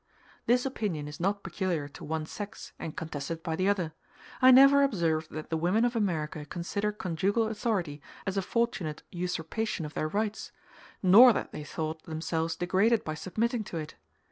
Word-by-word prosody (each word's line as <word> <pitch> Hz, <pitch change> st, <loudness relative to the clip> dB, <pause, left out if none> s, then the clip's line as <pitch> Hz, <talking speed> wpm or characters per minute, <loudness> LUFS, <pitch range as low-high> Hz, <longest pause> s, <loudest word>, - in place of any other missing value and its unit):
This 245 Hz, +2 st, +3 dB
opinion 200 Hz, -, -2 dB
is 150 Hz, -, -8 dB
not 200 Hz, +3 st, 0 dB
peculiar 175 Hz, -7 st, -2 dB
to -, -, -12 dB
one 155 Hz, 0 st, -2 dB
sex, 205 Hz, +5 st, -8 dB
and 160 Hz, -, -6 dB
contested 160 Hz, +1 st, -5 dB
by 160 Hz, +1 st, -2 dB
the 185 Hz, +3 st, +1 dB
other: 180 Hz, -6 st, 0 dB, 0.5 s
I 255 Hz, -, +8 dB
never 275 Hz, +2 st, +8 dB
observed 165 Hz, -, +1 dB
that 155 Hz, +1 st, -7 dB
the 160 Hz, -, +1 dB
women 185 Hz, +8 st, +2 dB
of 245 Hz, 0 st, 0 dB
America 160 Hz, -8 st, -1 dB
consider 185 Hz, +7 st, -2 dB
conjugal 205 Hz, +2 st, 0 dB
authority 200 Hz, -9 st, -2 dB, 0.2 s
as 195 Hz, -1 st, -2 dB
a 195 Hz, -, +1 dB
fortunate 205 Hz, -8 st, -1 dB
usurpation 180 Hz, +2 st, -3 dB
of 150 Hz, -, -8 dB
their 155 Hz, -, -1 dB
rights, 210 Hz, +5 st, -2 dB, 0.5 s
nor 225 Hz, +7 st, +9 dB
that -, -, -3 dB
they 150 Hz, -, -6 dB
thought 155 Hz, +1 st, -4 dB
themselves 160 Hz, 0 st, -2 dB
degraded 200 Hz, +6 st, +2 dB
by 155 Hz, -, -3 dB
submitting 215 Hz, +8 st, -1 dB
to 175 Hz, -, -5 dB
it. 155 Hz, -1 st, -5 dB
180 Hz, 170 wpm, -29 LUFS, 160-215 Hz, 0.5 s, nor